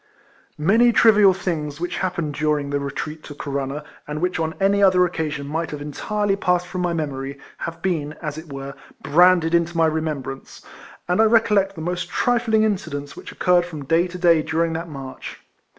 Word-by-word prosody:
Many 225 +10 +4
trivial 210 -4 +6
things 165 -6 -3
which 175 +1 -3
happened 170 -5 -2
during 150 -1 -1
the 145 - 0
retreat 150 +2 -5
to 145 - -9
Corunna, 140 0 -4 0.2
and 150 0 -4
which 180 0 -1
on 160 0 -2
any 200 +1 +3
other 185 -2 +5
occasion 155 -4 -3
might 160 +2 -2
have 150 - -6
entirely 195 +8 -1
passed 180 -2 +1
from 180 0 -4
my 175 -1 0
memory, 140 -4 -4 0.2
have 165 0 -6
been, 155 -6 -1
as 150 -2 -6
it 160 -1 -10
were, 135 0 -6 0.3
branded 175 0 +4
into 170 0 +1
my 165 - +4
remembrance, 155 -4 -4 0.4
and 180 +5 +2
I - - +6
recollect 210 -3 +3
the 160 - -7
most 175 +2 -3
trifling 235 -3 +2
incidents 160 -9 -2
which - - -9
occurred 180 -1 +3
from 155 -5 -8
day 165 +5 +2
to 180 +1 -8
day 170 -3 +4
during 165 +2 0
that 165 +1 -4
march. 135 -3 -8
165 Hz, 180 wpm, -22 LUFS, 150-185 Hz, 0.4 s, trivial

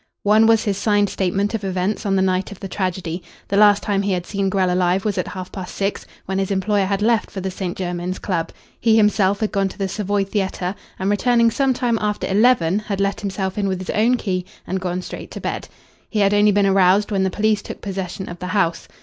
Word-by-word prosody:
One 215 +2 +5
was 225 -1 +4
his 200 -2 -1
signed 205 -2 +2
statement 195 +3 0
of 220 -2 -2
events 190 +3 -1
on 195 - +2
the 190 - +3
night 185 +1 0
of 200 - -10
the 195 - -6
tragedy. 185 -2 -3 0.3
The 200 - 0
last 205 0 +5
time 200 -1 +1
he 200 -1 0
had 180 -1 -2
seen 195 0 -1
Grell 185 -2 +1
alive 180 +2 +1
was 210 -2 0
at - - -2
half 185 -2 -7
past 185 -2 -7
six, 200 0 -2 0.2
when 190 0 -2
his 195 - -1
employer 200 +1 +1
had 200 +1 0
left 225 -1 +2
for 195 - -6
the 190 0 -3
St. 185 -1 -4
Jermyn's 180 0 -3
Club. 170 -4 -2 0.3
He 225 -1 +4
himself 205 -2 +3
had 215 - 0
gone 195 -1 +1
to - - -12
the 195 -2 -1
Savoy 205 +1 -1
Theatre, 190 -2 -2 0.2
and, 190 +2 0
returning 235 +2 +3
some 270 +1 +1
time 240 -3 0
after 210 -1 -1
eleven, 200 -3 +3
had 205 -2 -4
let 200 0 0
himself 195 0 -3
in 200 - 0
with 190 -1 -1
his 185 0 -4
own 235 +4 +3
key 185 -5 -2 0.2
and 190 +1 -3
gone 180 0 -2
straight - - -8
to - - -7
bed. - - -4 0.4
He 220 - -4
had 200 0 +3
only 205 0 +5
been 200 0 +3
aroused 195 +2 +4
when 195 -2 +1
the 190 - +2
police 215 +2 +1
took - - -8
possession 190 -1 -5
of 175 0 -8
the 180 - -5
house. 170 -4 0
195 Hz, 240 wpm, -21 LUFS, 185-210 Hz, 0.4 s, One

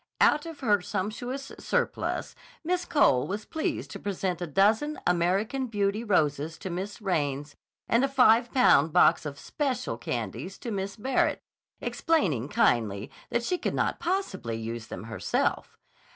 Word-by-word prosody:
Out 300 +2 +4
of 325 -3 -9
her 205 -6 +3
sumptuous 220 +8 -4
surplus, - - -1 0.3
Miss 360 +2 0
Cole 210 - +3
was 205 +2 -4
pleased 315 - -3
to - - -7
present 185 -3 -2
a 175 - -2
dozen 215 - +2
American 195 +10 +1
Beauty 205 0 0
roses 160 -6 +1
to 190 - -6
Miss 195 +5 -5
Raines 145 -6 -1 0.3
and 235 +3 +3
a - - +4
five 240 -3 +4
pound 160 - +5
box 175 -3 +5
of 140 -1 -7
"special" 250 - -2
candies 125 - -4
to 235 - -6
Miss 195 -1 -3
Barrett, 255 +4 0 0.4
explaining 165 - 0
kindly 110 -7 +1 0.2
that 235 - 0
she 360 +8 -1
could - - -2
not - - 0
possibly 335 - -2
use 115 0 -5
them - - -7
herself. 110 0 -1
200 Hz, 150 wpm, -28 LUFS, -, 0.4 s, pound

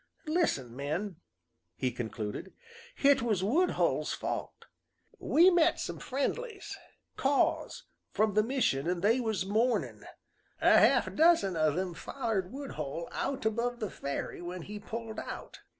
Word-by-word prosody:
"Listen, 305 - 0
men," 155 +7 -3 0.6
he 125 +6 -1
concluded, 115 - -5 0.4
"hit 280 0 +4
was 215 -6 0
Woodhull's 315 - +1
fault. - - -5 0.5
We 350 +4 +5
met 345 -1 +3
some - - -4
friendlies 400 - -3 0.4
Kaws 275 +1 +1 0.3
from 215 -1 +1
the 215 - +4
mission, 215 - 0
an' 180 -1 -1
they 225 +6 +3
was 220 -6 -1
mournin'. 225 +5 0 0.6
A - - +5
half - - +4
dozen 315 - +4
o' 155 -1 +3
them 180 +3 -2
follered 210 -3 -3
Woodhull 170 - -5
out 275 -5 -3
above 235 +2 0
the 215 -5 -3
ferry 140 +4 -4
when 175 0 -6
he 210 +3 -7
pulled 225 +1 -6
out. - - -7
215 Hz, 135 wpm, -31 LUFS, 175-270 Hz, 0.6 s, We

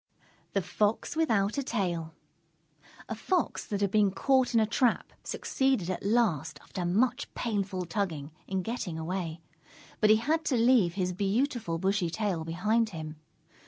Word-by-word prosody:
_ - - -40
THE 195 - +1
FOX 210 - 0
WITHOUT 225 -7 +2
A - - +1
TAIL 175 - -2 0.9
A - - -3
Fox 340 - -1
that 205 -1 -2
had 200 -2 +1
been 210 -1 +4
caught 260 +5 +2
in - - +6
a 220 - +4
trap, 235 +2 +1
succeeded 265 -10 0
at 185 - -4
last, 180 - +1
after 180 - -5
much 240 +8 +1
painful 200 -5 -2
tugging, 165 -5 -3 0.2
in 190 -1 -1
getting 225 -7 -3
away. 165 0 -3 0.6
But 215 - +4
he 215 - +8
had 310 +9 +1
to 260 - +2
leave 230 -7 +4
his 180 -2 -1
beautiful 205 - 0
bushy 190 0 +1
tail 185 -2 -1
behind 210 +8 +1
him. 155 -4 -7
200 Hz, 160 wpm, -29 LUFS, 175-230 Hz, 0.9 s, he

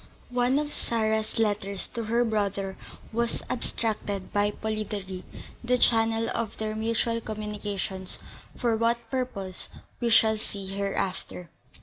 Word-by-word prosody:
One 245 +2 +3
of 295 0 0
Sarah's 220 -1 +1
letters 205 -3 +1
to 230 -2 -3
her 235 +2 +3
brother 200 -3 0 0.4
was 235 +1 0
abstracted 210 -5 -1
by 205 0 +4
Polidori, 210 -3 -3 0.4
the 250 +1 +3
channel 225 -1 +4
of 225 -2 -2
their 215 0 -2
mutual 230 +1 +1
communications; 205 -3 -3 0.4
for 235 -3 +2
what 230 0 +1
purpose 200 -8 -2 0.3
we 235 - +1
shall 220 -1 +6
see 200 -2 -5
hereafter. 195 -3 -2
220 Hz, 120 wpm, -28 LUFS, 200-230 Hz, 0.4 s, shall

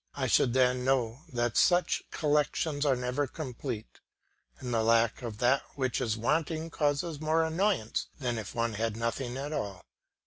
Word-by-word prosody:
I 135 - -1
should 120 0 +3
then 125 -1 +3
know 125 -2 +1
that 120 -2 -1
such 180 0 +3
collections 150 0 0
are 135 - +4
never 125 +3 -1
complete, 125 -5 -6 0.6
and 125 -2 -5
that 115 - +2
the - - +1
lack 115 +1 +3
of 115 -4 -5
that 125 +4 +3
which 130 -3 -1
is 110 -2 0
wanting 160 +6 0
causes 150 +1 -1
more 160 +1 +2
annoyance 160 - 0
than 120 -4 -2
if 110 - -7
one 115 -1 0
had 110 +1 -2
nothing 120 +2 -2
at 145 +3 -4
all. 100 -9 -4
130 Hz, 170 wpm, -30 LUFS, 115-150 Hz, 0.6 s, are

